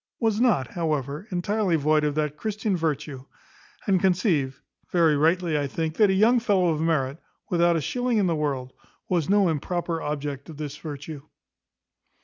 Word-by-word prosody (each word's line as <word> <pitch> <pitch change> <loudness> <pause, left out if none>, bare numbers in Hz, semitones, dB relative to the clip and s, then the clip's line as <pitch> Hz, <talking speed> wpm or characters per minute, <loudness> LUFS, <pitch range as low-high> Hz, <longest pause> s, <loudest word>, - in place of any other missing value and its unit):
was 225 -2 +1
not, 210 - +2
however, 155 - -2
entirely 190 0 0
void 155 0 +2
of 150 -1 0
that 150 -1 -1
Christian 215 +1 -2
virtue; 150 -5 -3 0.6
and 195 -4 +3
conceived 175 - +1 0.3
(very 165 -4 +3
rightly 165 +1 +2
I 145 - -1
think) 160 +3 -3
that 210 -2 +5
a - - +3
young 225 +6 +4
fellow 195 -6 +2
of 155 -1 0
merit, 155 -3 0 0.3
without 170 -1 +3
a 165 - 0
shilling 245 - -1
in 205 - +3
the 170 -2 +1
world, 135 -4 -2 0.3
was 175 -4 0
no 200 -1 +4
improper 170 +1 -2
object 145 -1 -4
of 155 - -9
this 150 -2 -5
virtue. 150 -1 -7
165 Hz, 165 wpm, -25 LUFS, 150-190 Hz, 0.6 s, that